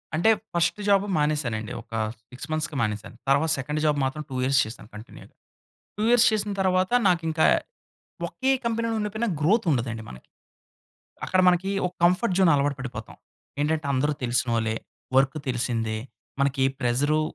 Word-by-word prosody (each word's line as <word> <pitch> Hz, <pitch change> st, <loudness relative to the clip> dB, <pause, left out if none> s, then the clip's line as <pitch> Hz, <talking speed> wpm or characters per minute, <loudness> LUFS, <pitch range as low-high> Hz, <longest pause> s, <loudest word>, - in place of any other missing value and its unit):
అంటే, 170 Hz, +7 st, +3 dB, 0.2 s
first 170 Hz, +4 st, +1 dB
job 200 Hz, 0 st, +4 dB
మానేశానండి. 140 Hz, -8 st, -1 dB
ఒక -, -, -24 dB, 0.4 s
6 130 Hz, +3 st, -8 dB
మంత్స్‌కి 155 Hz, 0 st, -2 dB
మానేసాను. 105 Hz, 0 st, -3 dB
తర్వాత 140 Hz, +4 st, +3 dB
సెకండ్ 150 Hz, +3 st, -3 dB
జాబ్ 150 Hz, -1 st, +2 dB
మాత్రం 140 Hz, +3 st, -3 dB
2 130 Hz, -, -6 dB
ఇయర్స్ 135 Hz, +1 st, +3 dB
చేశాను 110 Hz, -1 st, -10 dB
కంటిన్యూగా. 105 Hz, +2 st, -12 dB, 0.6 s
2 210 Hz, -, -1 dB
ఇయర్స్ 245 Hz, 0 st, +6 dB
చేసిన 210 Hz, -1 st, -1 dB
తరువాత, 185 Hz, 0 st, +1 dB, 0.2 s
నాకింక 165 Hz, -3 st, 0 dB, 0.9 s
ఒకే 265 Hz, 0 st, -1 dB
కంపెనీలో 230 Hz, 0 st, -1 dB
ఉండిపోయినా 215 Hz, +2 st, -2 dB
గ్రోత్ 200 Hz, +9 st, +2 dB
ఉండదండి 120 Hz, -4 st, -2 dB
మనకి. 65 Hz, -, -13 dB, 1.0 s
అక్కడ 185 Hz, -, +2 dB
మనకి 180 Hz, +2 st, +2 dB, 0.2 s
ఒక 180 Hz, -, -6 dB
కంఫర్ట్ 180 Hz, +3 st, +3 dB
జోన్ 185 Hz, -3 st, +5 dB
అలవాటు 140 Hz, 0 st, +1 dB
పడిపోతాం. 120 Hz, -4 st, -7 dB, 0.4 s
ఏంటంటే, 155 Hz, 0 st, 0 dB
అందరు 145 Hz, +3 st, +1 dB
తెలిసినోళ్లే, 120 Hz, -2 st, 0 dB, 0.4 s
వర్క్ 135 Hz, +2 st, +2 dB
తెలిసిందే, 115 Hz, -3 st, -1 dB, 0.4 s
మనకి 135 Hz, -1 st, +1 dB, 0.2 s
ప్రెసరు 140 Hz, +5 st, +1 dB
150 Hz, 140 wpm, -25 LUFS, 125-185 Hz, 1.0 s, ఇయర్స్